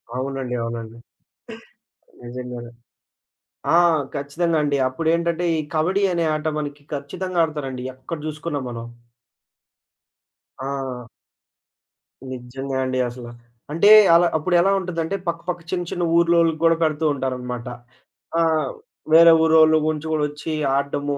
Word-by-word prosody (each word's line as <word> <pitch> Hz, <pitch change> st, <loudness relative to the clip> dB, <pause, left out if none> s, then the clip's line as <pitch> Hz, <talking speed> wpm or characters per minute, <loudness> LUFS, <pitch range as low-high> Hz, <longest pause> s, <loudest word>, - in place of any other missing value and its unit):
అవునండి. 130 Hz, -1 st, -3 dB
అవునండి. 115 Hz, -1 st, -6 dB, 1.3 s
నిజంగానే. 120 Hz, -1 st, -7 dB, 1.0 s
ఆ! -, -, +6 dB, 0.4 s
ఖచ్చితంగా 160 Hz, +4 st, -1 dB
అండి. 145 Hz, -1 st, +1 dB
అప్పుడేంటంటే, 170 Hz, +4 st, 0 dB
ఈ -, -, 0 dB, 0.2 s
కబడ్డీ 185 Hz, +6 st, +1 dB
అనే 170 Hz, -1 st, 0 dB
ఆట 155 Hz, +1 st, -3 dB
మనకి 145 Hz, -1 st, -6 dB
ఖచ్చితంగా 175 Hz, +5 st, -2 dB
ఆడతారండి 135 Hz, -5 st, -4 dB
ఎక్కడ 130 Hz, +5 st, -7 dB
చూసుకున్నా 155 Hz, -1 st, -4 dB
మనం. 115 Hz, -1 st, -6 dB, 1.8 s
ఆ! 135 Hz, -3 st, -5 dB, 1.2 s
నిజంగా 130 Hz, +2 st, -5 dB
అండి 130 Hz, 0 st, -1 dB
అసల. 120 Hz, 0 st, -8 dB, 0.4 s
అంటే 165 Hz, +7 st, +3 dB, 0.3 s
అలా 175 Hz, +1 st, +5 dB
అప్పుడు 175 Hz, +4 st, 0 dB
ఎలా 195 Hz, +3 st, +3 dB
ఉంటుదంటే, 175 Hz, 0 st, -3 dB
పక్కపక్క 170 Hz, +1 st, -3 dB
చిన్న 175 Hz, -2 st, -2 dB
చిన్న 175 Hz, -, -2 dB
ఊర్లోళ్ళకి 170 Hz, -2 st, +3 dB
కూడా 165 Hz, 0 st, +5 dB
పెడుతూ 155 Hz, 0 st, 0 dB
ఉంటారనమాట. 125 Hz, -2 st, -4 dB, 0.7 s
ఆహ్, 160 Hz, -4 st, +2 dB, 0.4 s
వేరే 165 Hz, +1 st, +9 dB
ఊరోళ్ళు 160 Hz, 0 st, +5 dB
గుంచి 155 Hz, 0 st, -2 dB
కూడా 155 Hz, -1 st, +1 dB
వచ్చి 150 Hz, +2 st, -6 dB, 0.2 s
ఆడడము. 140 Hz, +1 st, -1 dB
150 Hz, 115 wpm, -22 LUFS, 130-165 Hz, 1.8 s, వేరే